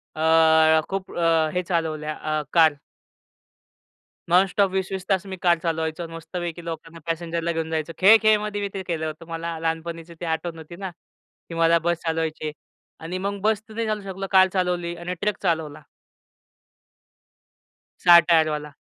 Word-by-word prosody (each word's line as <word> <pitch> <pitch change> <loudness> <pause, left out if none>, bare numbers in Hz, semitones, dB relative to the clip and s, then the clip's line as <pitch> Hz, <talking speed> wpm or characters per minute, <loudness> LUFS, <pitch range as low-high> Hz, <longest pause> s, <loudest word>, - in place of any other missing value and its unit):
अ, 160 0 +5
खूप 195 -1 -4
अ, 165 -2 +3
हे 180 - 0
चालवल्या 160 -3 -2
अ, 155 0 -2
कार. 160 -3 +6 1.6
नॉन-स्टॉप 190 +2 +3
20:00-20:00 190 0 -3
तास 195 -1 +1
मी - - -6
कार 175 -2 +3
चालवायचो. 160 0 -2
मस्त 165 0 -11
पैकी 175 -1 -4
लोकांना, 165 0 -7
पॅसेंजरला 165 0 -2
घेऊन 160 -1 -3
जायचो. 160 +1 -2
खेळ-खेळमध्ये 210 0 +4
मी 200 - -1
ते 195 - -4
केलं 160 -2 -2
होतं. 155 +2 -8
मला 165 0 -4
लहानपणीची 165 +1 -4
ती 175 - -5
आठवण 165 +1 -3
होती 160 +1 -10
ना 190 0 -6 0.6
की 170 - -7
मला 165 0 +4
बस 170 0 +2
चालवायची 160 -1 -2
आहे. 155 - -3 0.5
आणि 170 +3 -5
मग 200 +2 -3
बस 215 0 +1
नाही 225 +1 -3
चालवू 215 -1 -2
शकलो, 195 +1 -5
कार 190 -1 +6
चालवली 180 -2 -1
आणि 175 +1 -5
ट्रक 210 -1 0
चालवला. 160 -4 -1 2.2
6 175 -1 +9
टायर 165 -2 +3
वाला. 150 -1 -4
170 Hz, 155 wpm, -24 LUFS, 160-185 Hz, 2.2 s, 6